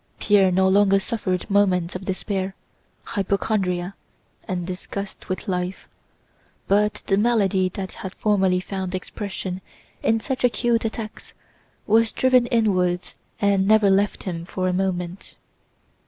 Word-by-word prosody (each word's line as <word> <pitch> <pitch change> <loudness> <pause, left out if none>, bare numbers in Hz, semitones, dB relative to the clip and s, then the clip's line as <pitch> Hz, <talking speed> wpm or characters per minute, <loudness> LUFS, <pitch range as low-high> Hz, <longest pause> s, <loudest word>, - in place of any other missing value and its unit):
Pierre 195 -3 +4
no 190 +1 +3
longer 195 0 +4
suffered 190 -3 -2
moments 190 -4 +2
of 185 +1 -5
despair, 190 0 -2 0.5
hypochondria, 195 -3 -1 0.5
and 180 -2 -2
disgust 195 +2 -6
with 185 +4 -3
life, 180 0 -3 0.8
but 210 +1 +2
the 195 - +2
malady 200 -5 +2
that 190 +1 -6
had 190 - -8
formerly 190 -3 +2
found 190 0 -4
expression 190 -1 -5 0.4
in 225 0 +2
such 260 +3 -3
acute 240 -1 +2
attacks 220 -1 -6 0.5
was 225 +1 +3
driven 255 -2 +3
inwards 185 -6 +1 0.3
and 200 -2 +2
never 215 -2 +5
left 200 +1 +1
him 170 -3 -4
for 185 +1 -2
a 180 - +1
moment. 180 -1 -3
195 Hz, 125 wpm, -23 LUFS, 185-210 Hz, 0.8 s, never